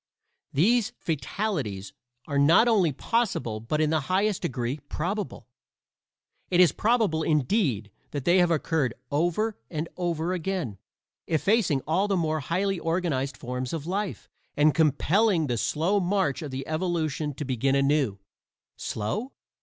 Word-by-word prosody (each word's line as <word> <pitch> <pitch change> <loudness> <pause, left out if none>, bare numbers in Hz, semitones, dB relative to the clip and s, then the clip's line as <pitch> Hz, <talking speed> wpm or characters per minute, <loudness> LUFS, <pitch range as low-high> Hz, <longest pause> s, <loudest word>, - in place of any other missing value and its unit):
These 230 - +2
fatalities 140 - -3 0.3
are 140 -2 -1
not 165 +11 +6
only 200 -9 +4
possible 135 - -1
but 115 +8 -2
in 155 -1 +2
the 160 - +2
highest 200 +1 +1
degree 125 +3 -2
probable. 195 +6 -3 1.0
It 180 - +2
is 180 -2 +7
probable, 220 -8 +1
indeed, 145 - +1 0.2
that 145 -3 -5
they 175 +2 +5
have 175 -1 +4
occurred 155 -5 0 0.2
over 175 +9 0
and 155 +1 -3
over 175 -1 -1
again, 175 - -3 0.5
effacing 165 - +2
all 180 +6 +1
the 195 -2 +1
more 155 -2 0
highly 185 +6 -1
organized 165 -6 -1
forms 125 +1 -4
of 155 -3 -4
life, 195 +2 -3 0.3
and 150 0 +5
compelling 165 - +3
the 125 -4 -1
slow 165 - +1
march 185 -6 0
of 150 -3 -6
evolution 155 0 -2
to 150 - -4
begin 135 +1 +1
anew. 140 -6 +2 0.6
Slow? 210 - -3
160 Hz, 135 wpm, -26 LUFS, 140-190 Hz, 1.0 s, is